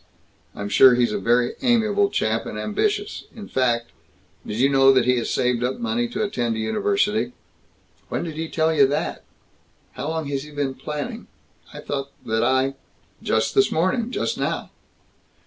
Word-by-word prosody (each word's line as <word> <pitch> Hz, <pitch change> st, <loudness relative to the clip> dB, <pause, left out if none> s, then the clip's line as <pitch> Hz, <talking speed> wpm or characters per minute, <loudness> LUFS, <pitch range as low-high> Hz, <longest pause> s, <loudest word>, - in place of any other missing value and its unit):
I'm 100 Hz, -, -4 dB
sure 125 Hz, +4 st, +7 dB
he's 120 Hz, -2 st, +2 dB
a 105 Hz, -, -1 dB
very 120 Hz, +4 st, +2 dB
amiable 215 Hz, -5 st, +3 dB
chap, 110 Hz, -, -1 dB
and 105 Hz, -, -6 dB
ambitious. 410 Hz, -, -1 dB
In 210 Hz, -3 st, -9 dB
fact 120 Hz, -2 st, 0 dB, 0.5 s
Did 105 Hz, -, -5 dB
you 130 Hz, +3 st, +4 dB
know 135 Hz, -1 st, +5 dB
that 130 Hz, -3 st, +3 dB
he 125 Hz, 0 st, +3 dB
has 120 Hz, -, -2 dB
saved 125 Hz, -1 st, +1 dB
up 125 Hz, +1 st, -1 dB
money 235 Hz, 0 st, -1 dB
to 220 Hz, -2 st, -3 dB
attend 120 Hz, -, -1 dB
a -, -, -4 dB
university?" 400 Hz, -, 0 dB, 0.8 s
"When -, -, -2 dB
did 165 Hz, -2 st, -5 dB
he 160 Hz, +1 st, -4 dB
tell 160 Hz, 0 st, +1 dB
you 140 Hz, -3 st, +5 dB
that? 145 Hz, +3 st, -2 dB, 0.7 s
How 145 Hz, -, -5 dB
long 160 Hz, -1 st, -2 dB
has 140 Hz, -1 st, -2 dB
he 150 Hz, -, -10 dB
been 145 Hz, -2 st, -2 dB
planning 150 Hz, +1 st, -6 dB, 0.4 s
I -, -, -9 dB
thought 140 Hz, -1 st, -4 dB, 0.2 s
that 110 Hz, 0 st, 0 dB
I 130 Hz, +2 st, +2 dB, 0.2 s
" -, -, -37 dB
"Just -, -, +1 dB
this 400 Hz, 0 st, +3 dB
morning; 185 Hz, +8 st, +1 dB
just -, -, -2 dB
now." -, -, -2 dB
140 Hz, 180 wpm, -23 LUFS, 120-205 Hz, 0.8 s, sure